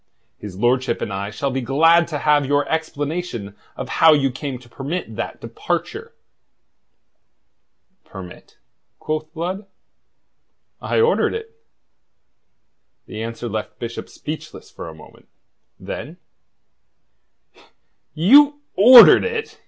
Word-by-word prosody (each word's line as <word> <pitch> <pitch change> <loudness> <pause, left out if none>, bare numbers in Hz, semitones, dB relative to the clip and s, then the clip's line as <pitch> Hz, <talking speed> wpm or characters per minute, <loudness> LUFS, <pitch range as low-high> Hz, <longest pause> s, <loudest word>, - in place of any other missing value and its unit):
His 100 -3 -9
lordship 125 +2 0
and 100 - -4
I 100 +1 -4
shall 135 +6 -3
be 130 +1 -2
glad 165 +7 +3
to 155 - -4
have 145 0 +2
your 145 +1 0
explanation 150 - -4 0.2
of - - -5
how 160 -1 +8
you 135 -3 +1
came 130 0 -6
to 120 -1 -18
permit 135 0 -6
that - - -5
departure." - - -5 1.9
"Permit?" 95 -2 -12 0.4
quoth 155 0 -4
Blood. 185 +5 -5 1.1
"I - - -1
ordered 460 0 +2
it." 450 0 -8 1.5
The 110 - -8
answer 115 +1 -6
left 110 -1 -5
Bishop 115 -1 -7
speechless 155 +1 -9
for - - -9
a 80 - -12
moment. 80 - -17 0.5
Then: - - -8 2.0
"You 285 - +5
ordered 240 +4 +9
it?" 460 -1 -5
145 Hz, 115 wpm, -20 LUFS, 120-170 Hz, 2.0 s, ordered